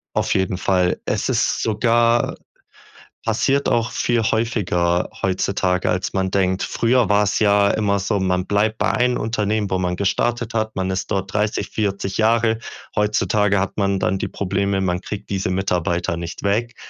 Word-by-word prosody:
Auf -, -, +1 dB
jeden 95 Hz, -1 st, 0 dB
Fall. 90 Hz, -1 st, +1 dB
Es -, -, -1 dB
ist -, -, +1 dB
sogar 115 Hz, +2 st, +2 dB, 0.9 s
passiert 135 Hz, +5 st, +1 dB
auch 115 Hz, 0 st, +1 dB
viel 120 Hz, -1 st, 0 dB
häufiger 95 Hz, -6 st, 0 dB
heutzutage, 95 Hz, -1 st, 0 dB
als 90 Hz, +1 st, -1 dB
man 95 Hz, -1 st, 0 dB
denkt. 95 Hz, -1 st, +1 dB
Früher 120 Hz, -1 st, +1 dB
war's 105 Hz, 0 st, +2 dB
ja 100 Hz, -1 st, +4 dB
immer 100 Hz, -2 st, +1 dB
so, 100 Hz, +1 st, -1 dB
man 90 Hz, -1 st, 0 dB
bleibt 105 Hz, +2 st, +1 dB
bei 110 Hz, +1 st, +1 dB
einem 125 Hz, 0 st, +1 dB
Unternehmen, 105 Hz, -2 st, -1 dB
wo 95 Hz, -, +1 dB
man 90 Hz, -1 st, -1 dB
gestartet 115 Hz, +5 st, -1 dB
hat. 110 Hz, -1 st, -1 dB
Man 95 Hz, 0 st, -1 dB
ist 95 Hz, 0 st, -3 dB
dort 95 Hz, 0 st, -2 dB
30, 105 Hz, +1 st, -1 dB
40 100 Hz, -2 st, -2 dB
Jahre. 115 Hz, 0 st, +2 dB, 0.4 s
Heutzutage 105 Hz, -1 st, +2 dB
hat 95 Hz, 0 st, -3 dB
man 100 Hz, -1 st, +1 dB
dann 95 Hz, +1 st, 0 dB
die -, -, -2 dB
Probleme, 100 Hz, 0 st, -1 dB
man 90 Hz, -1 st, -1 dB
kriegt 105 Hz, 0 st, -7 dB
diese 95 Hz, -2 st, -1 dB
Mitarbeiter 90 Hz, -2 st, -1 dB
nicht 85 Hz, 0 st, -7 dB
weg. 115 Hz, +5 st, 0 dB
100 Hz, 165 wpm, -21 LUFS, 95-110 Hz, 0.9 s, ja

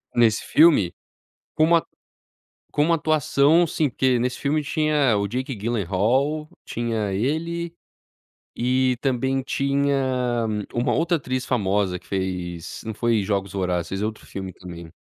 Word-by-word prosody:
Nesse 115 Hz, -2 st, +3 dB
filme? 150 Hz, -, +4 dB, 0.6 s
Com 155 Hz, -, +3 dB
uma 165 Hz, 0 st, +3 dB, 0.9 s
como 150 Hz, +3 st, +2 dB
atuação 155 Hz, 0 st, +3 dB
assim, 160 Hz, -2 st, +1 dB
porque 130 Hz, 0 st, +1 dB
nesse 125 Hz, +1 st, -1 dB
filme 150 Hz, +2 st, 0 dB
tinha 150 Hz, -5 st, +2 dB
o 100 Hz, 0 st, 0 dB
Jake 130 Hz, +5 st, -3 dB
Gyllenhaal, 120 Hz, -, 0 dB, 0.2 s
tinha 115 Hz, -4 st, -2 dB
ele, 165 Hz, -, -2 dB, 0.8 s
e 130 Hz, +1 st, +1 dB
também 135 Hz, 0 st, 0 dB
tinha 135 Hz, -3 st, 0 dB, 0.3 s
uma 120 Hz, +1 st, 0 dB
outra 170 Hz, +1 st, +2 dB
atriz 130 Hz, -3 st, -3 dB
famosa 100 Hz, -5 st, 0 dB
que -, -, -23 dB
fez, 90 Hz, -3 st, -4 dB
não 110 Hz, -1 st, -4 dB
foi 115 Hz, -1 st, +1 dB
Jogos 100 Hz, -1 st, -1 dB
Vorazes, 90 Hz, -3 st, -1 dB
fez 95 Hz, +1 st, -3 dB
outro 110 Hz, 0 st, -4 dB
filme 95 Hz, -1 st, -6 dB
também. 85 Hz, -2 st, -10 dB
125 Hz, 130 wpm, -23 LUFS, 100-145 Hz, 0.9 s, filme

